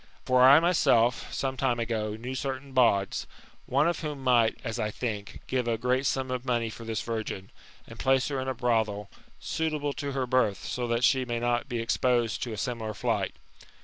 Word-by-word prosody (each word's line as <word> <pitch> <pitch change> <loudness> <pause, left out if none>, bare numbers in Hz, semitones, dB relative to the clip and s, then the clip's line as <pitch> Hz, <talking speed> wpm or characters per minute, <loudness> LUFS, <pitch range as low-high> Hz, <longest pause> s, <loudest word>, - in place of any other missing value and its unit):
For 130 0 +3
I 135 +4 +9
myself, 125 -9 +2
some 135 -1 -2
time 125 -3 +1
ago, 110 -2 -2
knew 120 +4 -6
certain 135 +1 -4
bawds, 100 -7 +2 0.4
one 140 +5 +3
of 170 - 0
whom 150 -4 -5
might, 120 -3 +3
as 115 -1 -4
I 105 -1 0
think, 105 -2 -5
give 125 -2 -1
a 115 -1 +1
great 125 +3 +1
sum 130 0 -1
of 125 -1 -2
money 120 -3 0
for 115 - -10
this 110 -1 -3
virgin, 110 -4 -4 0.3
and 115 0 -12
place 135 -1 +2
her 140 -2 -2
in 130 - -4
a 130 - -1
brothel, 110 -4 0 0.3
suitable 145 - -2
to 140 -1 -4
her 135 -1 -1
birth, 125 -6 +1
so 125 -1 -2
that 115 +1 0
she 130 +1 +4
may 120 -2 -2
not 120 +2 0
be 120 - -2
exposed 120 0 +1
to 120 - -3
a 110 - -5
similar 110 -2 -3
flight. - - -1
120 Hz, 200 wpm, -28 LUFS, 115-130 Hz, 0.4 s, I